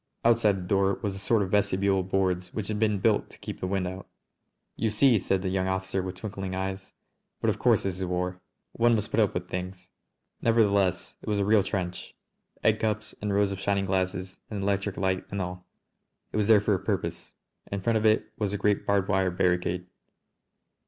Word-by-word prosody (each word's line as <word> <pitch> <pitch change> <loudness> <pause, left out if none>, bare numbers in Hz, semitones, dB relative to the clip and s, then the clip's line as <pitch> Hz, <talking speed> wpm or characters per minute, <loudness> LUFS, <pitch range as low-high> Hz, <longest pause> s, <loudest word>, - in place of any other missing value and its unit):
Outside 115 -3 +4
the 90 -1 -6
door 100 0 +2
was 100 -2 -1
a 95 - -7
sort 105 +2 +2
of 95 - -5
vestibule 100 -1 +2
of 95 0 -4
boards 90 -2 0
which 105 -2 -3
had 105 -1 -2
been 105 -2 +2
built 105 +2 +2
to - - -14
keep - - -7
the 95 - -2
wind 95 -1 0
out. 95 +1 -7 0.7
"You 115 - 0
see!" 115 +1 +4
said 95 0 0
the 95 - 0
young 95 0 0
officer 95 0 -1
with 95 0 -5
twinkling 95 -1 -5
eyes. 95 0 -4 0.5
"But - - +2
of - - -6
course - - +3
this 95 -1 -2
is 95 - -1
war. 90 0 -2 0.3
One 115 0 +3
must 105 -1 -2
put - - +1
up 105 -3 +2
with 90 0 -3
things!" 90 +1 -6 0.5
Nevertheless 100 -5 +2
it - - -6
was 105 - +1
a 100 - +1
real 105 0 +5
trench, 90 -2 -4 0.5
egg 110 0 +3
cups 110 0 -2
and 105 0 -1
rows 100 0 +2
of 100 - -4
shining 100 0 0
glasses 95 0 -2
and 100 -3 -4
electric 100 0 -1
light 95 0 0
and 100 - -3
all. 90 -1 -5 0.6
It - - -3
was 105 -1 +2
there 110 -2 +6
for 105 0 +2
a 95 - +1
purpose. - - -3 0.4
In 100 -1 -2
front 115 +3 +2
of 110 - -1
it 110 - +2
was 105 -2 -1
a - - 0
great 100 0 +1
barbed 100 -1 +2
wire 95 -2 +2
barricade. 90 0 0
95 Hz, 215 wpm, -27 LUFS, 95-105 Hz, 0.7 s, there